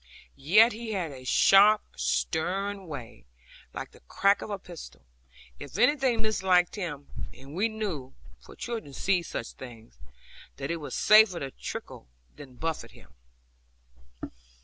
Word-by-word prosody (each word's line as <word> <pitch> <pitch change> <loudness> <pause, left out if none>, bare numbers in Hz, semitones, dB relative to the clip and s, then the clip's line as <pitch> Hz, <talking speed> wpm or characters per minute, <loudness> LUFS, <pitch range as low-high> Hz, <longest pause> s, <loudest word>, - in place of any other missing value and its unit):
Yet 205 - +5
he 225 0 -5
had 175 -6 -2
a 130 -2 -10
sharp, 200 +10 +6
stern 180 - -1
way, 120 - -9 0.4
like - - -7
the - - -18
crack 200 - +1
of - - -6
a 205 - -3
pistol, 175 -3 -12 0.6
if 145 - -8
anything 250 -1 +3
misliked 185 -4 +2
him; 150 -8 -5 0.3
and 135 +2 -12
we 205 +7 +1
knew 185 -12 -5 0.2
(for - - -15
children 225 -12 -6
see 185 +4 +1
such 135 -7 -6
things) 115 - -13 0.6
that - - -4
it 170 - -1
was 150 - -6
safer 215 -4 +6
to 135 -1 -5
tickle - - -8 0.3
than 130 -3 -12
buffet 150 -6 -4
him. 115 - -18
175 Hz, 140 wpm, -28 LUFS, 135-210 Hz, 0.6 s, sharp